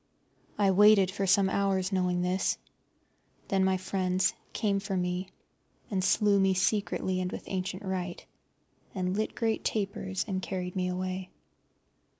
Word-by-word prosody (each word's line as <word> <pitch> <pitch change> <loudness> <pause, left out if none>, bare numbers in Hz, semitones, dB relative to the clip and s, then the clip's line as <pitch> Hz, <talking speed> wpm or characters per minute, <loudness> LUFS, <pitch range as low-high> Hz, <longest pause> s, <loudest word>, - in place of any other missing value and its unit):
I 200 -2 +4
waited 200 -1 +6
for 195 0 -2
some 195 +1 +4
hours, 190 -1 0
knowing 180 -2 +1
this. 185 +1 0 0.9
Then 195 -1 +2
my 190 0 +2
friends 185 0 0 0.2
came 200 -3 0
for 195 -1 -3
me, 180 +1 -2 0.6
and 190 -2 0
slew 200 +1 +3
me 195 -1 +3
secretly 190 -1 0
and 180 0 -2
with - - -6
ancient 185 +1 -4
rite, 185 -2 -4 0.7
and 185 0 -1
lit 215 +1 -2
great 225 -1 0
tapers, 195 -2 -2
and 190 -2 -2
carried 180 -1 -4
me 185 -1 0
away. 185 +1 -3
190 Hz, 145 wpm, -29 LUFS, 185-195 Hz, 0.9 s, waited